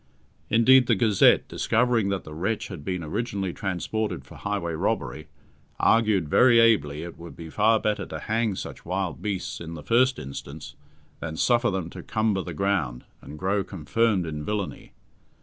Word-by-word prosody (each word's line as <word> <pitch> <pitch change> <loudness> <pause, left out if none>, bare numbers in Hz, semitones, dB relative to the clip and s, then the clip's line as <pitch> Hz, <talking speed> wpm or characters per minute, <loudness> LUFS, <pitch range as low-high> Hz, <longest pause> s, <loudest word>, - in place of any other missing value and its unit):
Indeed, 125 +3 +6
the 115 - +4
Gazette, 105 -1 +4
discovering 115 -3 +1
that 100 -1 -2
the 75 - -10
wretch 95 +8 -2
had 90 -8 -8
been 90 +1 -3
originally 100 +1 -3
transported 95 -4 -3
for - - -14
highway 100 -5 -3
robbery, 80 - -2 0.5
argued 105 -7 +3
very 120 - +5
ably 80 -10 +3
it 85 -1 -9
would 85 0 -10
be 80 -1 -9
far 110 +4 +3
better 105 0 -1
to - - -6
hang 110 -2 -1
such - - -7
wild 90 -2 -3
beasts 100 -5 -3
in 85 0 -7
the 75 - -9
first 125 - +3
instance 70 +1 -8 0.5
than 80 -1 -5
suffer 120 +3 +3
them 95 -4 -3
to - - -8
cumber 110 -3 0
the 90 -3 -7
ground, 80 -11 -1 0.2
and 75 - -10
grow 95 +4 0
confirmed 95 +4 0
in 75 -2 -5
villainy. 105 +1 -4
95 Hz, 165 wpm, -25 LUFS, 85-110 Hz, 0.5 s, Indeed